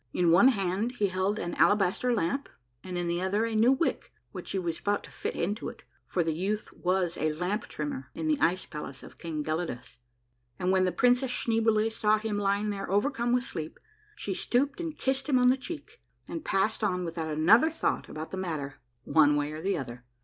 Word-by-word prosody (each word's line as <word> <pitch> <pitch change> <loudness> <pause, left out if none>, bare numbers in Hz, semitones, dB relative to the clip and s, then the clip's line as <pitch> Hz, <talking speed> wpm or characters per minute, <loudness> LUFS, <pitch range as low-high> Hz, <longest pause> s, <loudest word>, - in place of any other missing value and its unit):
In 175 -2 +3
one 195 +9 +7
hand 200 0 +1
he 205 -5 +1
held 190 +3 0
an 175 -4 -3
alabaster 205 +4 +3
lamp, 235 +5 0 0.3
and 180 -1 -5
in 175 - -1
the 170 +1 -1
other 200 +4 +1
a 230 - -3
new 225 +4 +5
wick 270 +5 0 0.2
which - - -8
he - - -2
was 170 -3 -2
about 205 0 0
to - - -12
fit - - -4
into 205 +6 -2
it, - - -13 0.2
for 175 - +1
the 160 -1 0
youth 200 +6 -2
was 180 -1 0
a 155 0 0
lamp 180 +7 -2
trimmer 145 -3 -5
in 315 - -3
the 305 -2 +2
ice 185 -3 +2
palace 150 -3 -7
of - - -13
King 160 -3 -3
Gelidus; 155 -7 -4 0.6
and 180 - 0
when 190 -1 +4
the 180 - +1
Princess 245 +7 +3
Schneeboule 225 -2 +1
saw 215 -1 +2
him 215 -1 -2
lying 205 +1 +1
there 195 -2 -5
overcome 235 +4 +1
with 250 0 +3
sleep, 160 - -6 0.4
she 205 - -3
stooped 275 - 0
and 325 -2 -4
kissed 265 +2 -1
him 265 - +4
on 250 0 +5
the 255 - +5
cheek, 340 - -8 0.3
and 330 - -5
passed 205 +3 0
on 180 -3 0
without 165 -1 -4
another 195 - +5
thought 325 - -1
about 155 +1 -6
the 190 - -4
matter, 155 -7 -4 0.2
one 150 0 +4
way 145 0 0
or 155 +1 -6
the 195 +1 0
other. 125 -3 -6
195 Hz, 210 wpm, -29 LUFS, 170-235 Hz, 0.6 s, one